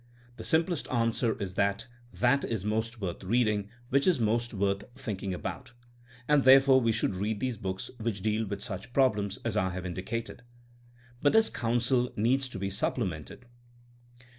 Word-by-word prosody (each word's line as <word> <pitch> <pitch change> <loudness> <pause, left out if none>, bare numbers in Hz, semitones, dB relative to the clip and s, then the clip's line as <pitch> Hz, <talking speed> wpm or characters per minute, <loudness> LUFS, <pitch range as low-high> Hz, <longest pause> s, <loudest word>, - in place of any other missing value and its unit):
The - - -7
simplest 165 -1 +1
answer 115 -1 +1
is 95 -3 -4
that 100 +3 0 0.3
that 125 +3 +2
is 110 -4 -3
most 110 +2 -2
worth 95 -2 -4
reading 105 -1 +1 0.2
which 140 +5 +2
is 180 -7 +3
most 115 +2 +1
worth 100 -1 0
thinking 105 -8 -4
about, 125 +7 -6 0.5
and 150 -2 +4
therefore 135 0 +7
we 115 -1 +2
should 110 -3 +1
read 105 +3 -2
those 125 -3 -2
books 95 -1 -4
which 110 -4 -3
deal 110 0 0
with 100 0 -5
such 110 +2 -6
problems 105 -7 +2
as - - -1
I 95 - +1
have 90 0 -5
indicated. 95 +8 -5 0.8
But 145 - +3
this 225 0 +5
counsel 120 +1 +1
needs 130 +5 +1
to 120 - -7
be 95 0 -3
supplemented. 95 - -3
115 Hz, 165 wpm, -29 LUFS, 100-125 Hz, 0.8 s, therefore